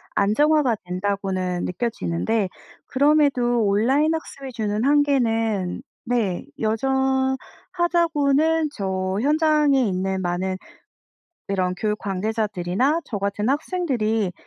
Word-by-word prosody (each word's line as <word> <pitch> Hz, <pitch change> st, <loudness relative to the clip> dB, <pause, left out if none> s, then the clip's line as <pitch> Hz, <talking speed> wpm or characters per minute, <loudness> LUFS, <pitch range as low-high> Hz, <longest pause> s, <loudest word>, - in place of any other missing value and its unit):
안정화가 270 Hz, +3 st, +3 dB
된다고는 185 Hz, -1 st, -2 dB
느껴지는데 210 Hz, 0 st, -1 dB, 0.4 s
그럼에도 270 Hz, -4 st, +3 dB
온라인 260 Hz, +10 st, +2 dB
학습이 275 Hz, -4 st, -7 dB
주는 215 Hz, -1 st, -2 dB
한계는 225 Hz, -9 st, +1 dB, 0.2 s
네 225 Hz, -7 st, -1 dB
여전하다고는 280 Hz, +6 st, +1 dB
저 190 Hz, -1 st, -2 dB
현장에 300 Hz, -1 st, +3 dB
있는 190 Hz, 0 st, -1 dB
많은 185 Hz, +1 st, -2 dB, 0.9 s
이런 185 Hz, -2 st, 0 dB
교육 210 Hz, 0 st, -1 dB
관계자들이나 210 Hz, -, -1 dB
저 210 Hz, -, -4 dB
같은 200 Hz, +2 st, -2 dB
학생들이 255 Hz, -, 0 dB
225 Hz, 250 characters per minute, -23 LUFS, 195-280 Hz, 0.9 s, 안정화가